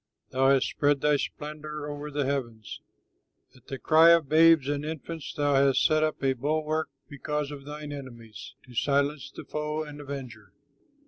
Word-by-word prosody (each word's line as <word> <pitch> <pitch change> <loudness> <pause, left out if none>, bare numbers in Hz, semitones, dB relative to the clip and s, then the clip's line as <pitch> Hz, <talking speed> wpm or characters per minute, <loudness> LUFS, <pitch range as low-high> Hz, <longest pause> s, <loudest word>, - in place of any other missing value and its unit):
Thou 135 +1 +3
hast 135 -1 +3
spread 145 -1 +1
thy 150 -1 +3
splendor 150 0 -6
over 145 0 -6
the 145 -1 -2
heavens; 120 -6 -4 0.7
At 125 - -22
the 135 - -5
cry 160 +4 +5
of 170 -3 +5
babes 160 -1 +5
and 145 0 -2
infants 160 0 -6
Thou 145 -2 0
hast 135 -1 +3
set 155 0 +3
up 155 -2 -1
a 135 -1 +3
bulwark, 155 +4 -1 0.2
because 150 0 -4
of 140 -2 -9
thine 150 0 -7
enemies, 120 -6 -10
To 125 - -15
silence 140 +3 0
the - - -11
foe 150 +1 -3
and 150 -1 -9
avenger. 130 -7 -8
145 Hz, 170 wpm, -27 LUFS, 135-150 Hz, 0.7 s, cry